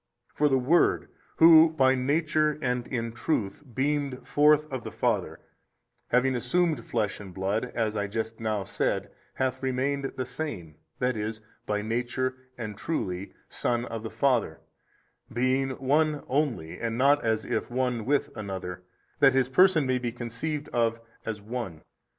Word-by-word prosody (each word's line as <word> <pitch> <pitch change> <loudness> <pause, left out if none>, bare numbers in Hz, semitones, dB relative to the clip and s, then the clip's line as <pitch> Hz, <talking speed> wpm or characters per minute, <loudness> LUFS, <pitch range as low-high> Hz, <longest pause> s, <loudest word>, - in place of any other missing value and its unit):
For 150 0 +2
the 135 - +3
Word 140 +7 +3 0.3
Who 160 0 +8
by 130 -3 +4
Nature 150 +3 +1
and 125 -4 -1
in 115 -3 -2
truth 115 -2 -2
beamed 140 -1 -1
forth 150 +1 +4
of 130 -3 -3
the - - -5
Father, - - -1 0.7
having 125 +2 +2
assumed 150 +2 +1
flesh 110 -4 -2
and 100 -2 -9
blood, 95 +6 -1
as 110 -2 0
I 105 -1 -1
just 110 +2 -4
now 110 -3 -1
said, - - -1 0.2
hath 130 -1 -1
remained 135 +2 -1
the 130 - -1
Same, 110 - -5 0.2
that 125 0 0
is, 110 0 -4 0.3
by 105 0 -1
Nature 125 +3 -1 0.2
and 110 -3 -5
truly 100 - -3
Son 120 0 -1
of 115 -2 -5
the 110 - -5
Father, 120 - +1 0.7
being 130 +3 +1
One 150 +2 +1
Only 130 - -1
and 115 0 -2
not 140 +3 +4
as 110 -1 0
if - - -2
one 125 -2 -1
with 140 +5 0
another, 95 -3 -5 0.4
that 135 -2 +6
His 130 -1 +2
Person 170 +1 +5
may 130 -1 +1
be 120 -1 -2
conceived 125 +6 -4
of 115 -1 +1 0.3
as 105 -2 -4
One. 110 -8 -5
125 Hz, 155 wpm, -27 LUFS, 110-140 Hz, 0.7 s, Who